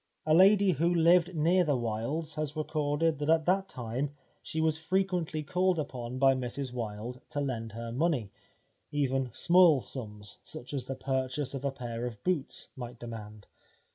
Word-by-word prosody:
A 155 - +3
lady 195 +3 +6
who 170 +2 +1
lived 175 +1 +4
near 170 +4 +3
the 145 -5 +1
Wildes 120 +8 -2
has 150 -1 -3
recorded 155 0 0
that 150 +1 -2
at 160 -1 +4
that 195 +1 +1
time 130 +4 -4 0.3
she 160 - -4
was 160 -1 +1
frequently 175 -2 -1
called 180 +3 +1
upon 130 -5 -4
by 135 0 +5
Mrs 130 0 -4
Wilde 115 +1 -5
to 145 - -3
lend 115 -6 -3
her 115 0 -5
money, 130 - 0 0.6
even 135 -3 0
small 170 +2 +5
sums 105 -5 -7
such 125 - -9
as 135 -3 -2
the 135 - -3
purchase 130 +1 -2
of 135 -1 -5
a 140 - +1
pair 120 -2 -4
of 115 -4 -9
boots 180 -7 -1
might 120 -2 -7
demand. 110 -3 -8
140 Hz, 170 wpm, -30 LUFS, 120-160 Hz, 0.6 s, lady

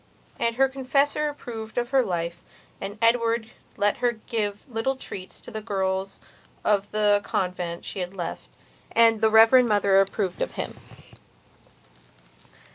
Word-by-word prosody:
And 230 0 0
her 270 +2 +4
confessor 275 +3 +1
approved 225 -6 -8
of 240 +1 -1
her 270 -2 +4
life, 170 -3 -3 0.4
and 200 +2 -5
Edward 230 -1 +2 0.3
let 205 0 +2
her 245 -1 +1
give 215 -2 -3
little 250 +2 -1
treats 190 -7 -9
to - - -11
the 220 -1 -5
girls 190 -2 -2 0.5
of 205 -1 +2
the 210 -1 +3
convent 180 -2 -3
she - - -6
had 180 +1 -4
left, 175 -3 -5 0.4
and 225 -1 +5
the 220 - +5
Reverend 225 +3 +6
Mother 200 -2 +4
approved 195 -1 -2
of - - -2
him. - - -4
220 Hz, 140 wpm, -25 LUFS, 195-240 Hz, 0.5 s, Reverend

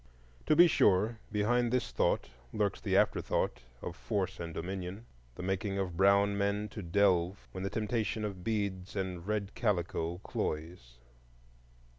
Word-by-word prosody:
To 155 - +5
be 175 +3 +9
sure, 110 - +3
behind 120 +3 +2
this 125 0 0
thought - - +1 0.2
lurks 105 -2 -1
the - - +2
afterthought - - +1 0.2
of - - -5
force 90 +10 -2
and 85 -1 -4
dominion,—the 90 - -7
making 95 +1 -1
of 95 -3 -2
brown 100 +2 +4
men 100 +1 0
to 105 - -7
delve 95 0 +2
when 95 - -5
the 100 - -1
temptation 110 -1 -1
of 95 -4 -5
beads 100 -3 -2
and 95 -2 -3
red 105 -1 -1
calico 85 -5 -1
cloys. 75 -6 -4
95 Hz, 140 wpm, -32 LUFS, 90-105 Hz, 0.2 s, be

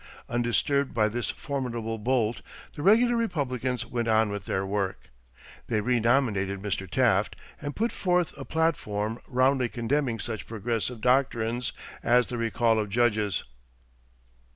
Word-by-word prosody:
Undisturbed 120 +4 +1
by 110 -2 +4
this 120 +3 -2
formidable 120 -5 -3
bolt, 115 -1 0 0.3
the - - -7
regular 230 +7 +5
Republicans 130 - -1
went 120 0 -2
on 110 -1 +3
with 100 -1 -5
their 95 0 -1
work. 95 -6 -3 0.6
They 110 -3 +1
renominated 115 -4 +1
Mr. 95 -2 -3
Taft 110 -4 +2 0.3
and 145 -1 -4
put 230 +2 0
forth 180 -2 0
a - - -7
platform 115 -9 -1
roundly 130 0 +2
condemning 120 0 -1
such 110 -3 -4
Progressive 115 +1 -2
doctrines 125 -2 +1 0.3
as 120 +1 +4
the 120 - -5
recall 115 0 +2
of 105 -1 -2
judges. 105 -3 +1
120 Hz, 130 wpm, -27 LUFS, 110-130 Hz, 0.6 s, regular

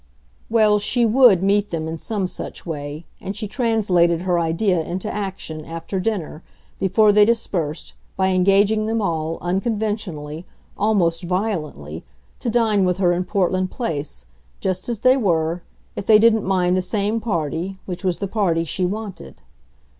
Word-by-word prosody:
Well, 215 -2 +4
she 235 +3 +1
WOULD 225 -5 +5
meet 205 +1 +2
them 160 -2 -3
in 160 0 -5
some 205 -1 -2
such 180 - -7
way, 150 -1 -6
and 195 - -5
she 210 +1 -4
translated 190 -7 +2
her 180 -2 +1
idea 170 +2 +1
into 175 +3 -4
action, 190 -6 -5
after 165 +4 -5
dinner, 185 -6 -3 0.4
before 205 +3 +4
they 210 0 +6
dispersed, 185 -9 -1 0.2
by 190 0 +2
engaging 200 +3 +3
them 225 +1 0
all, 165 -4 -1
unconventionally, 190 -5 -2 0.3
almost 180 -6 +1
violently, 165 - -3 0.4
to - - -2
dine 220 -4 +2
with 180 -1 +1
her 180 -2 +3
in 180 +1 -1
Portland 185 0 0
Place, 150 - -4 0.3
just 185 +3 -2
as 230 -3 -3
they 255 +2 +5
were, 170 -6 0 0.3
if 200 - -6
they 215 - +8
didn't 220 0 +4
mind 185 -1 +2
the 185 - +2
same 210 +3 -1
party, 175 -2 -2
which 180 +1 -6
was 180 -2 0
the 200 - -3
party 185 -5 +1
she 180 +3 -1
wanted. 200 - -6
190 Hz, 155 wpm, -21 LUFS, 170-210 Hz, 0.4 s, they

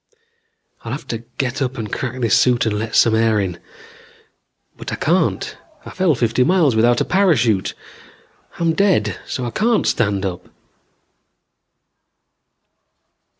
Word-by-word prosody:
"I'll - - -5
have - - -6
to 115 - -3 0.2
get 130 +1 -2
up 130 0 -2
and 110 -3 -5
crack 130 0 -4
this 115 -1 +3
suit 120 0 +3
and 105 -2 -1
let 110 0 -4
some 115 - +5
air 110 -1 +2
in. 90 -3 -3 1.2
But - - -8
I - - -2
can't. - - 0 0.3
I - - -8
fell 185 -5 +1
fifty 120 +1 +1
miles 160 -6 +3
without 120 +2 +3
a - - +1
parachute. 130 - +2 0.8
I'm 165 -1 +1
dead 165 - +1
so 125 - -4
I 120 - -4
can't 225 - +1
stand 100 -3 0
up." 90 -2 -5
120 Hz, 140 wpm, -19 LUFS, 110-145 Hz, 1.2 s, some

